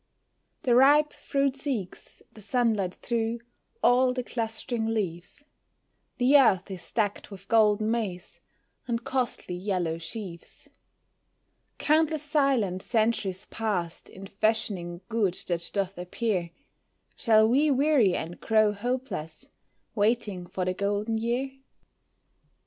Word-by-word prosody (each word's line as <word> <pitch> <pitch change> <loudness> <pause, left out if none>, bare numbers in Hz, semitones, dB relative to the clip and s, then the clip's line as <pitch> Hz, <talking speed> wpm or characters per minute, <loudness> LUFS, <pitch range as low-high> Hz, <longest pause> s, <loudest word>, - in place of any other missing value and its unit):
The 245 - +3
ripe 290 +4 +5
fruit 275 -1 -1
seeks 260 -10 -5
the 215 - -13
sunlight 215 -4 0
through 230 0 -1 0.4
all 250 +1 +4
the 250 0 -3
clustering 225 -1 -3
leaves 205 - -4 0.7
The 260 +3 +6
earth 200 -7 +3
is 180 -3 -8
decked 205 -3 -1
with 195 -1 -12
golden 215 -1 +3
maize, 200 -6 -4 0.5
and 235 -1 -2
costly 250 -8 -2
yellow 180 -3 -2
sheaves. 175 0 -9 1.1
Countless 310 0 +2
silent 275 - +1
centuries 215 -4 0
passed 190 -7 -3
in 195 - -10
fashioning 195 -4 -1
good 210 -6 0
that 170 -1 -2
doth 195 -2 -2
appear, 180 -1 -2 0.7
Shall 220 -2 +4
we 280 +6 +3
weary 275 -8 +3
and 165 +2 -5
grow 215 -1 +3
hopeless, 225 - -4 0.4
waiting 205 -4 0
for 185 +1 -3
the 185 - 0
Golden 205 +3 -1
Year? 240 +4 -1
220 Hz, 115 wpm, -27 LUFS, 185-245 Hz, 1.1 s, The